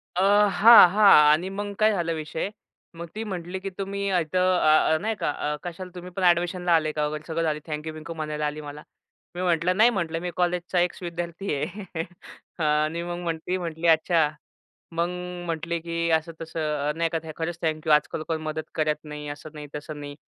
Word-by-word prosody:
अ, 185 - +1 0.3
हां, 205 0 +9
हां. 205 +2 +6 0.2
आणि 175 +5 +1
मग 205 +1 -4
काय 215 0 +5
झालं 170 -5 -1
विषय? 160 +4 -4 0.5
मग 170 +1 -6
ती 220 - -3
म्हटली 185 -3 -5
की 195 - -5
तुम्ही 200 0 -3
अ, 185 - +2
इथं 170 +2 -1 0.2
अ, 155 0 +4
अ, - - +2
नाही 220 +1 -1
का - - -2
अ, 150 +1 -3
कशाला? 180 +1 -7
तुम्ही 180 0 -8
पण 185 +1 -4
ॲडमिशनला 175 0 +2
आले 155 -1 +1
का? 150 0 -1
वगैरे 150 +1 -5
सगळं 165 0 -1
झालं. 155 -1 0
थँक्यू-बिंकू 155 +1 -5
म्हणायला 150 -1 -3
आली 150 +1 -3
मला. 145 0 -9 0.5
मी 180 - -3
म्हटलं, 175 0 +1
"नाही," 225 +3 +7
म्हटलं, 170 -7 -2
"मी 180 +1 -4
कॉलेजचा 180 0 0
एक्स-विद्यार्थी 175 0 -3
आहे." 175 +9 -4 0.8
अ, - - 0
आणि 155 +2 +1
मग 175 0 -4
म्हणती 170 +2 -2
म्हटली, 170 -1 -3
"अच्छा." 160 -1 +4 0.6
मग 170 +1 0 0.4
म्हटले 170 +1 -2
की 170 0 -2
असं-तसं, 160 0 -2 0.3
अ, - - 0
नाही 165 0 0
का, 165 - -1
"थ 155 - -7
खरंच 165 +1 -3
थँक्यू. 155 -1 0
आज-काल 150 +1 +2
कोण 160 -1 -1
मदत 155 0 -4
करत 155 -1 +1
नाही." 150 -1 -7
असं 145 +2 -8
नाही, 150 -1 -8
तसं 150 0 -6
नाही. 145 0 -8
165 Hz, 195 wpm, -25 LUFS, 155-180 Hz, 0.8 s, हां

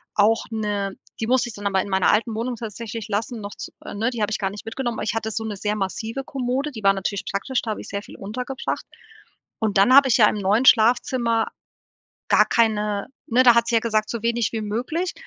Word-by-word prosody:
auch 215 +2 +3
'ne 205 -3 -2 0.2
die 225 - -1
musste 250 0 +2
ich - - -9
dann 205 - -9
aber 190 -1 +2
in - - -8
meiner 190 -1 +3
alten 225 +1 +1
Wohnung 240 +2 -2
tatsächlich 225 0 -6
lassen, 225 +3 -2
noch 200 0 -7
z - - -8 0.2
ne, 225 +4 0
die 235 -3 -4
habe 210 +1 0
ich - - 0
gar 195 -2 0
nicht 205 - -10
mitgenommen, 235 0 -3
aber - - -2
ich 210 -1 -1
hatte 220 -1 -2
so 225 - -3
'ne 220 -2 -4
sehr 210 +1 -1
massive 220 +6 -3
Kommode, 270 0 -2
die 220 -5 -9
war 195 - +5
natürlich 195 0 -3
praktisch, 235 +6 -1
da 220 - -2
habe - - -4
ich - - -10
sehr 200 - -3
viel - - -13
untergebracht 250 +6 -4 0.7
und 215 -3 0
dann 205 +6 +5
habe 280 -1 +7
ich - - +4
ja 215 -3 +7
im - - -3
neuen 205 +5 +2
Schlafzimmer 235 0 +4 0.8
gar - - +6
keine 210 -3 +1 0.2
ne, 250 +3 +4
da 240 -2 +7
hat 235 0 +3
sie 235 - +1
ja - - +5
gesagt, 215 -2 0
so 235 -2 -3
wenig 235 -1 0
wie 220 - -2
möglich 255 - -2
225 Hz, 235 wpm, -23 LUFS, 205-240 Hz, 0.8 s, habe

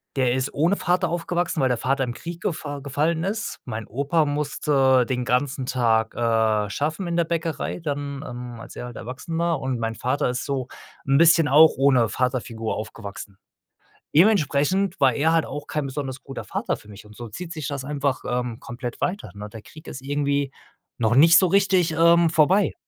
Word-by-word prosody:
der 125 -2 +2
ist 130 +1 -1
ohne 170 +7 +2
Vater 180 0 +1
aufgewachsen, 175 -1 -1
weil 130 - +3
der 125 -2 0
Vater 135 +2 0
im 120 - -4
Krieg 170 +5 -8
gefa 145 -5 -3
gefallen 150 +4 -1
ist. 215 +3 -3
Mein 110 -3 -5
Opa 145 +7 0
musste 140 -3 +2
den 125 0 -2
ganzen 130 +2 0
Tag, 115 -3 +1
äh, 110 -3 +1
schaffen 155 - -2
in 170 0 -1
der 170 - +2
Bäckerei 165 +1 -3
dann, 145 -2 -4
ähm, 120 -1 -7
als - - -11
er 125 - -5
halt 120 - -9
erwachsen 130 +9 -6
war 170 -3 +1
und 130 -2 -2
mein 115 0 -2
Vater 130 +3 -1
ist 125 - -3
so 135 -3 -2 0.4
'n 135 0 +3
bisschen 165 -1 +5
auch 155 +3 +7
ohne 130 -4 +4
Vaterfigur 120 -2 -2
aufgewachsen. 100 -2 -8 0.8
Dementsprechend 185 +1 +3
war 135 -2 +4
er 160 +3 +2
halt 165 -1 +2
auch 145 0 -6
kein 150 -2 -2
besonders 135 -1 -5
guter 135 -1 -7
Vater - - -2
für 105 - -18
mich 105 +1 -12
und 105 - -15
so 120 -1 -8
zieht 170 +10 -7
sich 155 -4 -5
das 140 -2 -4
einfach, 140 -2 -1
ähm, 125 -1 -2
komplett 120 -1 -7
weiter, 195 +3 -2
ne, 105 +1 -7
der 110 -1 -11
Krieg 155 +1 -15
ist 130 - -8
irgendwie 140 0 -1 0.5
noch 115 -1 +2
nicht 165 +6 +7
so 185 - +4
richtig, 190 -2 +3
ähm, 170 +1 +5
vorbei. 170 +5 +3
140 Hz, 190 wpm, -23 LUFS, 125-165 Hz, 0.8 s, auch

